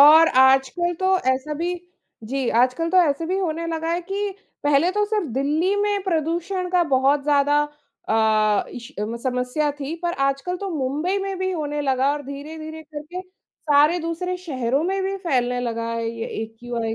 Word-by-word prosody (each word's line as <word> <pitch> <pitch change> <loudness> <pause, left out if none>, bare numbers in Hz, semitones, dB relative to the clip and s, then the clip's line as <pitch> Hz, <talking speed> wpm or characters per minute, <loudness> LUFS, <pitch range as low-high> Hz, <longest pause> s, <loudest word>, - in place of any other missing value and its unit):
और 315 +3 +9
आजकल 270 +7 +3
तो 375 0 +3 0.2
ऐसा 295 +4 -3
भी 345 +3 -2 0.5
जी 265 -2 -1
आजकल 295 +7 +1
तो 370 - +2
ऐसा 285 +4 -3
भी 375 +2 0
होने 335 -2 -2
लगा 325 0 -2
है 345 - 0
कि, 400 +3 -2 0.3
पहले 295 +5 +4
तो 420 0 +2
सिर्फ 420 -5 -1
दिल्ली 305 +8 +1
में 410 -1 +1
प्रदूषण 345 +2 -1
का 360 -1 +4
बहुत 275 +2 +3
ज़्यादा 290 0 +3 0.5
अ, 215 -1 +3
इश 245 +3 -9 0.3
समस्या 255 +3 0
थी 280 +4 -3
पर 345 0 0
आजकल 275 +7 0
तो 395 - -4
मुंबई 305 +6 -1
में 390 -1 -3
भी 375 0 -1
होने 295 -3 -2
लगा 270 0 +2
और 295 0 -4
धीरे-धीरे 310 +3 -7
करके, 310 +4 -7 0.5
सारे 300 +4 +5
दूसरे 340 +2 -3
शहरों 260 0 0
में 385 +1 0
भी 390 +1 -1
फैलने 250 -4 +1
लगा 230 -1 -2
है 230 0 -2
ये 230 0 -4 0.2
एक्यूआई 225 0 -4
300 Hz, 170 wpm, -23 LUFS, 265-355 Hz, 0.5 s, और